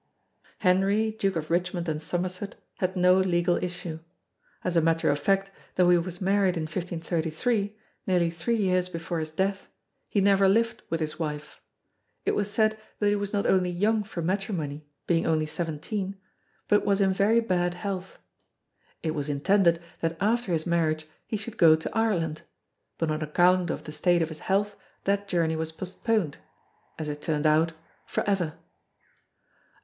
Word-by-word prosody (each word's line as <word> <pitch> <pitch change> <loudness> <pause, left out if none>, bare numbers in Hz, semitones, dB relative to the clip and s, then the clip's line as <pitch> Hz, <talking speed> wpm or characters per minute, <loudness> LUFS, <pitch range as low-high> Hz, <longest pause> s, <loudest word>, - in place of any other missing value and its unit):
Henry 195 +4 +2
Duke 195 -3 -1
of 160 0 -3
Richmond 175 0 0
and 155 -1 -2
Somerset 180 +4 -3 0.2
had 185 +1 0
no 180 0 +5
legal 175 -2 +2
issue. 175 -2 -4 0.6
As 180 - -1
a 165 - +5
matter 165 -1 +2
of 145 - 0
fact 195 +5 +1 0.2
though 180 -1 +5
he 175 - +6
was 175 +1 -5
married 195 -2 +2
in 160 - -1
1533, 175 +5 -2 0.3
nearly 175 -3 +2
three 170 +8 -1
years 185 -4 +1
before 170 -1 -3
his 155 0 -3
death, 190 +4 -1 0.4
he 205 - +1
never 195 0 +5
lived 230 +3 +2
with 165 0 -1
his 155 +1 -3
wife. 150 -2 -5 0.6
It - - +3
was 205 0 0
said 215 +1 +2 0.2
that 205 - +2
he 205 - +3
was 205 -1 -2
not 205 -1 0
only 185 -1 +3
young 210 +5 +1
for 195 -5 -5
matrimony, 165 -6 -2 0.2
being 165 -1 +1
only 155 -1 +2
seventeen; 175 +6 -4 0.5
but 210 - +4
was 200 -1 +2
in 195 -1 +3
very 205 +4 +4
bad 180 -5 0
health. 190 0 -5 0.9
It 160 - 0
was 150 -2 -3
intended 170 +4 +3 0.2
that 165 0 -1
after 220 +1 +1
his 160 -2 0
marriage 160 -3 +1 0.2
he 215 - -2
should 215 +2 -7
go 165 -5 +7
to 160 - -5
Ireland; 175 -9 0 0.6
but 165 -2 0
on 155 +1 -2
account 175 +3 +3
of - - -3
the 150 - -7
state 170 +3 +2
of 160 - -3
his 155 -1 -7
health 200 +3 0 0.3
that 200 +1 0
journey 165 -4 +1
was 160 0 -2
postponed 185 -1 -1 0.6
as 155 - -4
it 150 0 -5
turned 150 -1 -1
out, 160 +2 +4 0.3
for - - -2
ever. 180 -6 0
180 Hz, 170 wpm, -27 LUFS, 160-200 Hz, 0.9 s, go